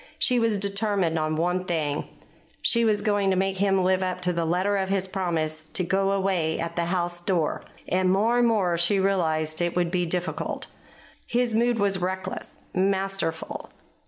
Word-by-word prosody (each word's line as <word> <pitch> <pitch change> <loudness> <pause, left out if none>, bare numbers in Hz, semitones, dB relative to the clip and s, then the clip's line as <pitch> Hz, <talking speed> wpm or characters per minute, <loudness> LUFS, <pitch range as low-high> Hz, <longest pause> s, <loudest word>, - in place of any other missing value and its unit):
She 250 -2 +3
was 225 -2 +2
determined 200 -4 0
on 155 0 0
one 180 +3 0
thing. 155 -4 -1 0.6
She 235 0 +3
was 210 -2 +2
going 205 -2 +2
to 190 - +2
make 190 +1 0
him 195 -1 +2
live 185 0 +2
up 185 -1 -2
to 180 0 +1
the 170 -1 -1
letter 185 +5 +1
of 190 -1 -1
his 195 -1 0
promise 160 -5 -2
to 185 - 0
go 195 +2 +1
away 190 -5 0
at 165 0 -3
the 170 - 0
house 175 0 -2
door; 175 -4 0 0.2
and 185 +1 +2
more 225 +5 +3
and 240 - +4
more 185 -7 +1
she 185 +4 +3
realized 160 -5 +1
that 175 - +2
it 175 - -3
would 175 -1 +1
be 180 -1 0
difficult. 180 +1 -2 0.6
His 240 -1 +1
mood 235 +1 +2
was 200 -2 +1
reckless, 185 +1 -4 0.2
masterful. 190 -3 -1
185 Hz, 185 wpm, -25 LUFS, 170-200 Hz, 0.6 s, and